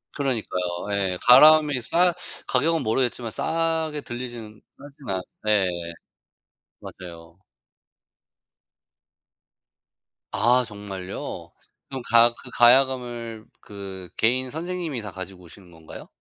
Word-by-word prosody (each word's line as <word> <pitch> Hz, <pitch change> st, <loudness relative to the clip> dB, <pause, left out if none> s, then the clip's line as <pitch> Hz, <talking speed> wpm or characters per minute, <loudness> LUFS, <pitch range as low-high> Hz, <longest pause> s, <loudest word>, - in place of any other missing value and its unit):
그러니까요. 100 Hz, -9 st, -3 dB
예. 95 Hz, -2 st, -1 dB
가야금이 150 Hz, +1 st, +7 dB
싸 175 Hz, +9 st, +3 dB, 0.3 s
가격은 160 Hz, +6 st, +1 dB
모르겠지만 120 Hz, 0 st, -1 dB
싸게 160 Hz, +1 st, -1 dB
들리지는 120 Hz, -4 st, -8 dB, 0.2 s
싸진 140 Hz, -3 st, -13 dB
않 95 Hz, -, -3 dB, 0.3 s
예. 105 Hz, -3 st, +3 dB, 1.1 s
맞아요. 85 Hz, -2 st, -11 dB, 2.9 s
아 125 Hz, +1 st, +3 dB
정말요? 100 Hz, -3 st, -7 dB, 0.4 s
그럼 135 Hz, -2 st, -5 dB
가 115 Hz, +1 st, +6 dB
그 -, -, -13 dB
가야금을 120 Hz, -3 st, +2 dB, 0.2 s
그 95 Hz, -3 st, -9 dB
개인 130 Hz, +3 st, +2 dB
선생님이 165 Hz, -5 st, -4 dB
다 105 Hz, -, -7 dB
가지고 95 Hz, 0 st, -9 dB
오시는 90 Hz, +1 st, -14 dB
건가요? 80 Hz, -1 st, -12 dB
120 Hz, 225 characters per minute, -24 LUFS, 100-135 Hz, 2.9 s, 가야금이